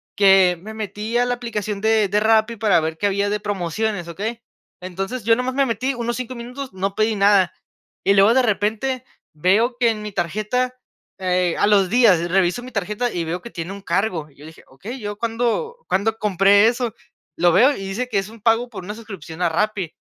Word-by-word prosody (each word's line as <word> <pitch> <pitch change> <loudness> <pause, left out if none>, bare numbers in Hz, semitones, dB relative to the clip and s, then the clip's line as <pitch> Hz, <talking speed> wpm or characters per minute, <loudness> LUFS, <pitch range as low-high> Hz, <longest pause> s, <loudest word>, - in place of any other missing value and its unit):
que 190 -3 +5
me 215 +3 -8
metí 215 +2 -4
a 245 - +3
la 245 - 0
aplicación 215 -4 -4
de 220 -1 +3
de 205 +2 +2
Rappi 220 +1 +3
para 210 -4 +3
ver 160 0 -3
qué 205 - +1
había 200 0 0
de 210 +1 -1
promociones, 205 -1 -2
¿okey? 215 +8 -5 0.4
Entonces 195 +6 -5
yo 225 +2 +4
nomás 250 +2 -2
me 275 0 +3
metí 255 +3 -1
unos 240 -1 -3
5 255 0 -5
minutos, 250 +2 -7
no 195 +1 -3
pedí 215 0 +1
nada. 200 -2 +4 0.5
Y 200 - +4
luego 200 +3 +5
de 260 - +4
repente 225 +3 -1 0.3
veo 205 +10 +2
que 240 -2 +4
en 215 -2 -2
mi 210 0 -6
tarjeta, 215 +8 -1 0.4
eh, 180 -2 0
a - - +3
los 200 -3 +4
días 195 -7 +4
reviso 185 +4 +1
mi 255 +1 -10
tarjeta 210 +4 -2
y 170 - -2
veo 165 +2 -4
que 235 - -9
tiene 170 -3 -6
un 200 0 -8
cargo. 185 -6 -1
Y 140 - -25
yo 145 - -14
dije: 160 0 -14
"Okey, 210 - -9
¿yo 205 -2 -5
cuándo 235 - -1
cuándo 215 +3 0
compré 200 0 +4
eso?", 240 -1 -1 0.4
lo 175 0 +4
veo 230 - +5
y - - -8
dice 230 +6 -3
que 215 - -1
es 195 +1 -5
un 225 0 -14
pago 230 +2 +2
por 205 -6 -8
una 205 +4 -6
suscripción 190 -7 -9
a 175 - +3
Rappi. 190 -1 -1
210 Hz, 210 wpm, -21 LUFS, 190-230 Hz, 0.5 s, que